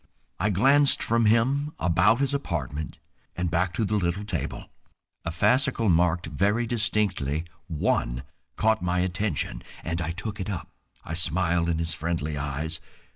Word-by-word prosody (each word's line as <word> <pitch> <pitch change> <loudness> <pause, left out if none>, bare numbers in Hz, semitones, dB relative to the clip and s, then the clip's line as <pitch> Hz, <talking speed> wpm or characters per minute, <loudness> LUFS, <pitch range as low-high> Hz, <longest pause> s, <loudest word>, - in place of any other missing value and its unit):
I 105 - +2
glanced 135 +9 +5
from 115 -1 +2
him 135 +7 +2
about 90 +8 +3
his 140 0 +1
apartment 80 - -3 0.4
and 90 -1 -2
back 85 +1 +1
to 110 - +1
the 105 +1 +1
little 90 +1 -1
table. 105 - -4 0.5
A - - -1
fascicle 125 - +2
marked 85 +1 +2
very 100 +9 +1
distinctly 105 - 0 0.2
"1" 65 -5 0 0.3
caught 110 0 +2
my 90 0 +1
attention, 95 +3 -1 0.2
and 85 +1 -2
I 80 - -2
took 100 +5 -5
it 95 - -3
up. 90 -6 -4 0.4
I 80 - -5
smiled 85 0 0
in 85 - +1
his 85 0 -1
friendly 80 -2 -2
eyes. 75 +3 -3
90 Hz, 150 wpm, -26 LUFS, 80-110 Hz, 0.5 s, glanced